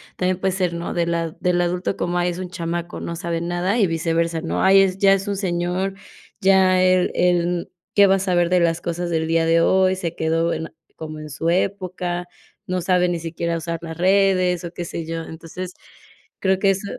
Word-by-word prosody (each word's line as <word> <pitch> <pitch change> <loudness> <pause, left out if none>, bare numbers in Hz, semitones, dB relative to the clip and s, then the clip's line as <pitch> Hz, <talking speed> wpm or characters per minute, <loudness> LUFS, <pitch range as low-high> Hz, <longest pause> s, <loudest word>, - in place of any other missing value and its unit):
también 185 0 0
puede 190 -1 0
ser, 180 -3 0
¿no? 170 +1 -4
Del 170 0 0
a 165 -1 -2
del 175 -1 +1
adulto 180 +2 -1
como: 175 0 -1
“Ay, 175 0 +1
es 175 - -7
un 180 -1 -5
chamaco, 170 0 -4
no 170 - -5
sabe 170 0 -3
nada”, 175 +5 -1
y 205 - +4
viceversa, 165 0 0
¿no?: 165 - -2
“Ay, 195 +1 +7
es 190 -1 +1
ya 195 0 +5
es 195 +1 -1
un 200 -1 -2
señor, 180 +1 -1 0.5
ya 190 -1 +4
él 185 0 +3
él 175 -1 +1 0.2
qué 200 -1 +6
va 195 - +4
a - - 0
saber 175 -2 +1
de 180 0 +3
las 165 -1 +1
cosas 175 0 -3
del 160 -1 0
día 165 0 +2
de 165 0 +4
hoy. 190 +1 +3
Se 170 -3 -4
quedó 165 +1 0
en 160 - -4 0.2
como 155 -1 -7
en 155 0 -8
su 160 +3 -4
época, 180 -2 -2 0.4
no 185 0 -2
sabe 180 0 +2
ni 175 -1 -1
siquiera 170 +1 -3
usar 165 0 -3
las 160 -1 -6
redes", 185 -1 +3
o, 170 - -6
qué 175 - -5
sé 165 -1 -5
yo. 165 0 -4
Entonces, 170 +3 -8 0.6
creo 190 -1 +2
que 195 -1 +4
eso 195 +1 -3
175 Hz, 215 wpm, -21 LUFS, 170-185 Hz, 0.6 s, Ay